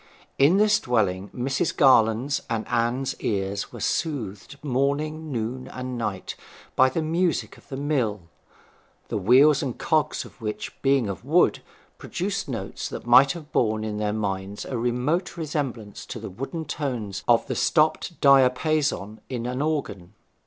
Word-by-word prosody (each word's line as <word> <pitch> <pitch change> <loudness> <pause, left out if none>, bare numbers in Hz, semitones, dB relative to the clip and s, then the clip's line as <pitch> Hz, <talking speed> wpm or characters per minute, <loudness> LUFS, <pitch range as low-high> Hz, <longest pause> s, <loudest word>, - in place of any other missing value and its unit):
In 150 +8 +5
this 210 +1 +4
dwelling 100 -6 0
Mrs. 135 +5 -1
Garland's 130 0 +4
and 115 -1 -2
Anne's 125 +3 0
ears 100 -1 -2
were - - -9
soothed 130 - -3
morning, 150 +3 -1
noon, 125 +1 -3
and 130 0 -6
night 105 -5 -4 0.4
by 130 0 +5
the 160 +5 -2
music 170 +2 0
of - - -20
the 135 - -5
mill, 130 -8 0 0.9
the - - -1
wheels 135 +8 +5
and 130 -5 -3
cogs 155 -2 0
of - - -16
which, 105 -1 -4
being 135 -4 +3
of 100 -4 -5
wood, - - +3 0.4
produced - - -3
notes - - -4
that - - -7
might 130 +3 +6
have 155 -3 -10
borne 110 -1 +1
in 105 -1 -3
their 105 0 0
minds 100 -1 -3
a 130 - -4
remote 125 +11 -1
resemblance 135 -10 -4
to - - -6
the - - -7
wooden 135 - -5
tones 115 -10 -4
of 120 -1 +4
the - - -3
stopped 155 +1 +1
diapason 135 -4 +3
in 120 -2 -3
an 125 +2 -2
organ. 110 - -3
130 Hz, 150 wpm, -25 LUFS, 110-145 Hz, 0.9 s, might